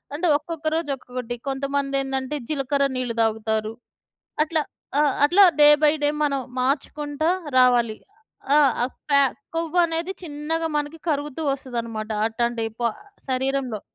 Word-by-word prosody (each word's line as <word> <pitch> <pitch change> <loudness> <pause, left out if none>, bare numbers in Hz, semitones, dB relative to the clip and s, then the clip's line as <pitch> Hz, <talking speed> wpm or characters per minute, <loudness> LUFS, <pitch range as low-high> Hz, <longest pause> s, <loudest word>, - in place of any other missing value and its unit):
అంటే, 340 +4 0
ఒక్కొక్క 315 +1 -6
రోజు 325 -2 -2
ఒక్కొక్కటి. 250 -2 -6
కొంతమందేందంటే, 275 0 -1
జీలకర్ర 280 -1 0
నీళ్లు 250 -2 -2
దాగుతారు. 220 -1 0 0.7
అట్లా. 315 -1 0 0.4
ఆ! - - +5 0.2
అట్లా 355 +7 +6 0.2
డే 295 - +9
బై 300 -1 +6
డే 290 - +3 0.2
మనం 280 -2 0 0.2
మార్చుకుంటా 290 +3 -1 0.3
రావాలి. 240 -3 +4 0.6
ఆ! - - +7 0.2
ఆ - - +4 0.3
ఫ్యా 280 -1 +6 0.3
కొవ్వనేది 335 +1 0
చిన్నగా 320 +1 -3
మనకి 295 +2 -4
కరుగుతూ 295 0 -2
వస్తదనమాట 230 -5 -4 0.2
అట్టాంటి 235 0 -1 0.2
పొ 235 - +2 0.4
శరీరంలో. 260 -3 -1
275 Hz, 120 wpm, -23 LUFS, 245-300 Hz, 0.7 s, డే